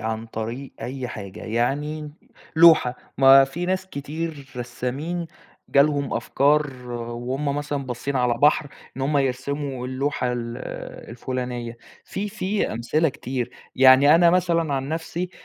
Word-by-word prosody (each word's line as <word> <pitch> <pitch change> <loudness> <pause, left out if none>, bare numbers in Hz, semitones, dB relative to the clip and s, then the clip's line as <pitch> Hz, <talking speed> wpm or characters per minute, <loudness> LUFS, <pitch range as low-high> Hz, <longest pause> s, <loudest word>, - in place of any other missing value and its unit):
عن 110 0 -3
طريق 115 +4 -5
أي 130 0 -4
حاجة. 100 -3 -8
يعني 145 +7 -1 0.5
لوحة، 160 -7 +7 0.2
ما 135 0 +8
في 170 +6 -5
ناس 185 +1 -1
كتير 145 -2 -6
رسّامين 130 +8 -4 0.4
جالهم 140 0 +3
أفكار 140 -3 +1
وهم 120 +4 -3
مثلًا 145 -1 -3
بصّين 125 +3 -3
على 125 -2 +2
بحر، 145 +3 +3 0.3
إن 135 - -4
هم 145 +2 +2
يرسموا 135 0 -2
اللوحة 130 -1 -1
ال 120 -1 -4 0.5
الفُلانية. 120 -1 -4 0.3
في 205 +2 -4
في 205 0 -1
أمثلة 150 +8 +1
كتير. 125 -2 -4 0.3
يعني 135 +3 +7
أنا 170 0 +6
مثلًا 170 -4 +1
عن 135 0 -2
نفسي 165 +3 -3
135 Hz, 130 wpm, -23 LUFS, 125-150 Hz, 0.5 s, ما